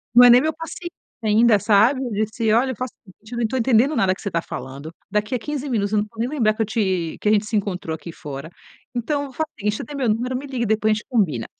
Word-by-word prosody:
Não 245 - +10
é - - +9
nem 245 +1 +8
meu 315 +2 0
paciente 330 +2 -7 0.3
ainda, 220 0 +4
sabe. 220 +7 +4
Eu 245 - -4
disse: 215 +2 0
"Olha, 260 +3 +2
faça 255 0 -5
o - - -13
seguinte, 215 +4 -19
eu - - -4
não 230 - +1
tô 260 - -2
entendendo 255 +4 +3
nada 195 -7 +3
que - - -14
você 200 - -4
tá 170 - 0
falando. 135 +3 -8 0.2
Daqui 210 +4 0
a - - -1
15 290 +2 -4
minutos 205 -5 0
eu 210 - +4
não 210 - -2
vou 225 0 -16
nem 235 +2 0
lembrar 235 -8 +2
que 215 - -4
eu - - +2
te 190 -6 -1
que 210 - +1
a - - +4
gente 210 0 +3
se 215 - -3
encontrou 185 -5 -2
aqui 170 +1 -9
fora. 145 -1 -8 0.5
Então, 285 +3 -2
faz 315 +5 -2
o - - -29
seguinte: 210 0 0
você - - -5
tem 290 - -8
meu 260 -4 0
número, 245 +4 0
me 270 - -6
liga 260 -3 -2
e - - +1
depois 220 0 +2
a - - +5
gente 215 - -4
combina". 180 - +1
220 Hz, 290 wpm, -22 LUFS, 205-250 Hz, 0.5 s, Não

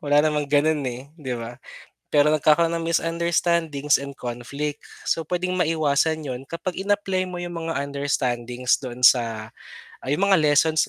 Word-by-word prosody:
wala 145 0 +1
namang 150 -2 0
ganun 150 +2 +3
eh, 125 +4 -8
'di 130 -4 -3
ba? 120 +1 -7 0.5
Pero 150 +1 +4
nagkakaroon 155 +2 +3
ng 165 0 -2
misunderstandings 165 -3 +1
and 140 -1 -8
conflict. 140 +5 -5 0.2
So, 165 - +1
pwedeng 180 0 -1
maiwasan 160 -2 +1
yun 125 -2 -4
kapag 175 +2 -4
in-apply 195 -2 0
mo 180 - -6
yung 175 0 -5
mga 165 - -2
understandings 125 -3 -1
doon 125 -1 0
sa 115 -2 +3 0.5
ay 135 - 0
yung 200 +1 +2
mga 195 - +6
lessons 155 +1 +3
150 Hz, 155 wpm, -23 LUFS, 130-165 Hz, 0.5 s, mga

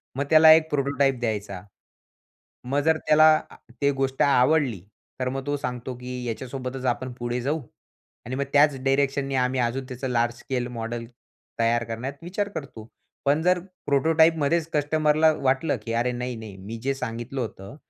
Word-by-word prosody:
मग 140 - 0
त्याला 160 0 +8
एक 160 0 +3
प्रोटोटाइप 140 -2 +1
द्यायचा. 105 -5 -3 1.0
मग 135 +3 0
जर 160 0 +4
त्याला 155 +1 +7 0.2
अ, - - -14 0.3
ते 140 0 +3
गोष्ट 135 0 -1
आवडली. 135 - +3 0.4
तर 130 0 0
मग 135 0 -4
तो 145 0 0
सांगतो 125 -1 -5
की 125 0 -6
याच्यासोबतच 130 +2 -5
आपण 130 +1 -1
पुढे 120 0 -3
जाऊ 150 +5 -1 0.6
आणि 130 - -4
मग 140 - 0
त्याच 145 0 +5
डायरेक्शननी 135 0 +1
आम्ही 130 0 +1
अजून 125 +2 -1
त्याचं 130 +1 -5
लार्ज 120 -1 +1
स्केल 125 -1 -3
मॉडल 115 +1 -4 0.5
तयार 115 +1 +2
करण्यात 115 +4 -5
विचार 200 +4 -2
करतो. 115 -7 -7 0.4
पण 145 +3 +3
जर 180 +1 +3 0.3
प्रोटोटाइपमध्येच 160 +2 +3
कस्टमरला 155 +1 +3
वाटलं 135 +1 0
की 115 - -4
अरे 120 +2 +1
नाही-नाही 120 -4 -5
मी 100 +4 -7
जे 135 +1 +1
सांगितलं 125 +1 -4
होतं 105 0 -7
130 Hz, 160 wpm, -25 LUFS, 120-145 Hz, 1.0 s, त्याला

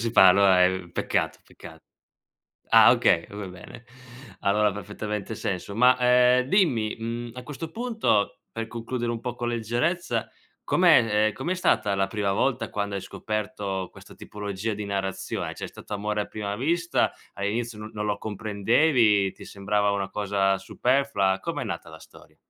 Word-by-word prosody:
si 115 0 -1
fa 95 -5 +7
allora, 95 -1 +5
ehm, 90 -2 -1
peccato, - - -1
peccato. - - -14 0.9
Ah, - - +8
okay, 85 - +3
va 100 0 -7
bene. 95 +6 -12 0.6
Allora 105 +1 +2
ha - - -4
perfettamente 105 +1 -5
senso. 100 +1 -4
Ma, 125 +3 +6
ehm, 125 +1 +4
dimmi, 130 - +2
mhmm, 115 +1 -4
a 125 - -8
questo 150 +4 -7
punto, 220 - 0
per 115 0 -4
concludere 120 +1 -3
un 115 - -4
po' 125 -1 -4
con 120 0 -3
leggerezza, 120 - -1 0.4
com'è 115 -12 +4
ehm, 110 - -2
com'è 155 +8 -2
stata 105 - +1
la 95 0 +1
prima 100 -1 -1
volta 120 -1 0
quando 100 -1 -3
hai 95 - -3
scoperto 100 -2 -4
questa - - -15
tipologia 105 +1 -5
di 105 0 -5
narrazione? 95 -1 -3
Cioè, - - -6
è - - -6
stato - - -10
amore 105 +1 -1
a - - -3
prima 100 -1 -5
vista? 165 +8 +1 0.2
All'inizio 110 +3 -3
no 110 0 -8
non 105 0 -3
lo 105 -1 -1
comprendevi? 105 +1 +2
Ti - - -13
sembrava 105 +1 0
una 100 -1 -2
cosa 100 -1 0
superflua? 100 -2 +1
Com'è 165 -4 -4
nata 100 -7 -6
la 80 - -12
storia? - - -18
105 Hz, 165 wpm, -25 LUFS, 100-120 Hz, 0.9 s, Ah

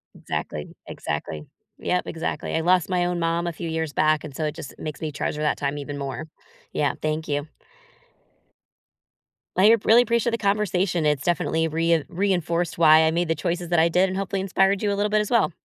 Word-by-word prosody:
Exactly, 75 -1 -5
exactly. 75 0 -5 0.3
Yep, 180 0 0
exactly. 165 - -3
I 160 - +1
lost 180 +1 +3
my 180 -1 +1
own 175 0 -1
mom 170 +1 0
a 170 - -2
few 165 +1 -5
years 160 -2 -2
back, 155 0 +2
and 140 -3 -9
so 160 - -3
it 150 - -3
just 135 - -8
makes 155 -2 -6
me 155 -2 -3
treasure 150 +1 -3
that 150 - +1
time 140 0 -2
even 145 0 -6
more. 140 +2 -5 0.5
Yeah, - - +1
thank 155 +1 -2
you. 145 +1 -2 2.1
I 210 +5 +7
really 230 +2 +6
appreciate 235 0 +1
the 230 - 0
conversation. 195 -5 0
It's 150 -2 +1
definitely 165 -1 +1
rein 165 0 +1
reinforced 175 -2 -1
why 160 -1 +7
I 160 - +3
made 175 +1 0
the 165 - +1
choices 175 -1 -3
that 175 -2 +3
I 165 +1 +4
did 180 +3 +3
and 190 - -3
hopefully 195 0 -2
inspired 195 +1 +2
you 205 - +1
a 200 - 0
little 205 +1 0
bit 215 0 +3
as 210 - -4
well. 235 -5 +3
170 Hz, 205 wpm, -24 LUFS, 155-190 Hz, 2.1 s, I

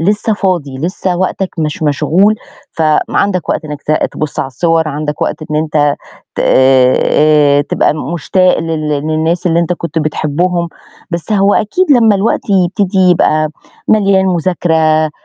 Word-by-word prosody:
لسه 210 +5 0
فاضي، 175 -10 -2
لسه 180 +3 -2
وقتك 185 +1 -2
مش 155 0 -3
مشغول 170 +8 +2 0.4
فعندك 165 +3 0
وقت - - -2
إنك 150 -1 -7
ت 155 - -1 0.2
تبُص 155 -1 -5
على - - -2
الصور، 160 +4 0
عندك 150 0 -4
وقت - - -1
إن 150 - -1
أنت 150 -2 +1 0.4
ت - - -9
آآ 130 -1 +4
آآ 150 -1 +3
تبقى 145 - 0 0.2
مشتاق 185 +3 +1
لل 160 -2 -3
للناس 155 +4 -1
اللي 170 -1 +2
أنت 170 +1 -1
كنت 170 -2 -4
بتحبهم، 170 +3 -1 0.4
بس 170 +5 -4
هو 200 0 +3
أكيد 355 - 0
لمّا 225 -5 +4
الوقت 205 +2 -1
يبتدي 190 +1 +1
يبقى 155 -3 +2 0.4
مليان 195 -3 +3
مذاكرة، 175 -1 0
آآ 155 -1 +2
165 Hz, 150 wpm, -13 LUFS, 150-185 Hz, 0.4 s, آآ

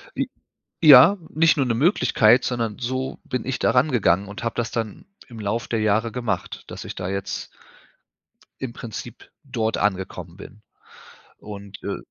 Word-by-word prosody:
J - - -1 0.5
Ja, 155 +6 +9
nicht 160 +1 +3
nur 140 - +2
'ne 115 - 0
Möglichkeit, 125 - +4
sondern 115 -4 -2
so 130 +2 -3
bin 125 -3 -3
ich 130 - -2
da - - +3
rangegangen 115 - +2
und 105 +4 -8
habe 115 - -2
das 120 -2 -1
dann 110 -3 -4 0.2
im 115 - -11
Laufe 110 +3 -2
der 115 - -1
Jahre 110 +2 +1
gemacht, 120 -2 -3
dass - - -8
ich - - -7
da 90 -1 -4
jetzt 100 0 -4 1.1
im 130 -3 -4
Prinzip 120 +1 -9
dort 115 -5 -2
angekommen 95 -2 -2
bin. 105 +1 -13 0.8
Und, 100 -1 -10
äh 100 - -3
115 Hz, 160 wpm, -23 LUFS, 105-125 Hz, 1.1 s, Ja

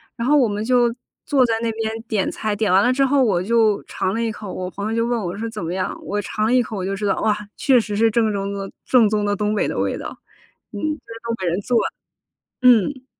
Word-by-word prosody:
然 235 - -3
后 295 +3 +4
我 260 -4 +4
们 205 0 -3
就 240 0 +3 0.3
坐 270 -3 +3
在 230 - 0
那 230 - 0
边 220 0 -2 0.2
点 210 -5 0
菜， 215 -1 -2
点 205 -2 0
完 190 +1 +5
了 245 +5 +3
之 275 +1 +2
后， 275 +1 +3
我 195 -8 +2
就 220 -1 +2
尝 185 - -2
了 230 +2 -1
一 225 - -1
口， 210 -2 -8
我 185 0 -4
朋 200 +3 -4
友 225 - -2
就 230 0 +1
问 240 -1 -1
我 180 0 -4
说： 225 +2 -3
“怎 215 -4 -6
么 165 +1 -3
样？” 185 0 -2
我 205 0 -2
尝 215 +2 -2
了 230 - +2
一 250 -1 +4
口， 215 -1 -6
我 185 - -3
就 195 +1 -2
知 205 +1 -4
道， 200 - +1
哇， 210 -1 +2 0.2
确 265 -3 +4
实 210 -2 -3
是 225 +1 +4
正 220 0 +2
中 200 0 -3
的 195 -1 -5
正 235 -5 +4
宗 210 -1 0
的 205 0 +1
东 210 +1 -1
北 210 - +1
的 - - -3
味 - - -1
道。 - - -7 0.6
嗯， - - -6
这 305 -6 -4
是 230 - -10
东 230 - -2
北 185 - -3
人 175 +3 0
做 245 +4 0 0.7
的， 250 - +1
嗯。 250 +3 +3
220 Hz, 295 characters per minute, -21 LUFS, 200-235 Hz, 0.7 s, 完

